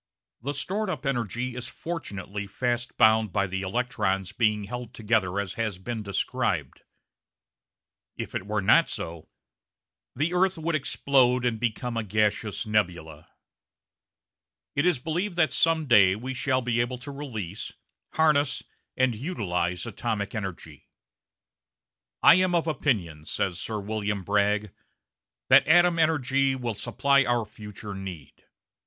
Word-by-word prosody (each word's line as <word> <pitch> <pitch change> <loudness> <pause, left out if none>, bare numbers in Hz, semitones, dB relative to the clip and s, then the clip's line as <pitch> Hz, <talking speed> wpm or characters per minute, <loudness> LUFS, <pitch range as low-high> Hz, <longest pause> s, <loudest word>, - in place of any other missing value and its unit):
The 140 +4 -3
stored 205 +7 -2
up 145 -6 -4
energy 120 -1 -2
is 125 - -5
fortunately 105 - -5
fast 120 +3 -2
bound 110 -1 +5
by 100 0 +1
the 95 0 -3
electrons 95 -3 -1
being 105 -2 +1
held 120 +3 -7
together 105 -4 +1
as 100 -2 -3
has 110 -5 -2
been 110 +4 -5
described. 100 -2 -2 1.4
If - - -6
it 95 - -4
were 105 -1 -1
not 165 +12 +5
so 85 -1 -6 0.9
"the 155 +7 0
earth 185 0 +2
would 165 +1 -2
explode 130 -3 +2
and 115 -3 0
become 120 +1 -2
a 115 - 0
gaseous 105 +1 0
nebula"! 85 -7 -2 1.5
It 140 +5 +2
is 175 -5 +3
believed 170 +8 -2
that 170 -3 +2
some 165 -1 +3
day 100 -7 +6
we 125 +5 -5
shall 130 0 0
be 120 -1 +1
able 125 +1 -2
to 140 +4 -8
release, 110 - -6 0.4
harness, 150 -3 +2 0.3
and 130 -1 +3
utilise 95 - -2
atomic 110 -2 -3
energy. 90 -7 -7 1.3
"I - - +10
am 185 -1 +2
of 170 - +2
opinion," 100 - -1
says 90 +1 -2
Sir 110 0 -3
William 105 -1 -2
Bragg, 105 +1 +1 0.8
"that - - +7
atom 175 +1 +5
energy 135 -4 +2
will 120 -3 -3
supply 130 +6 +2
our 120 -3 +1
future 105 0 -9
need. 95 -6 -9
115 Hz, 135 wpm, -26 LUFS, 100-135 Hz, 1.5 s, I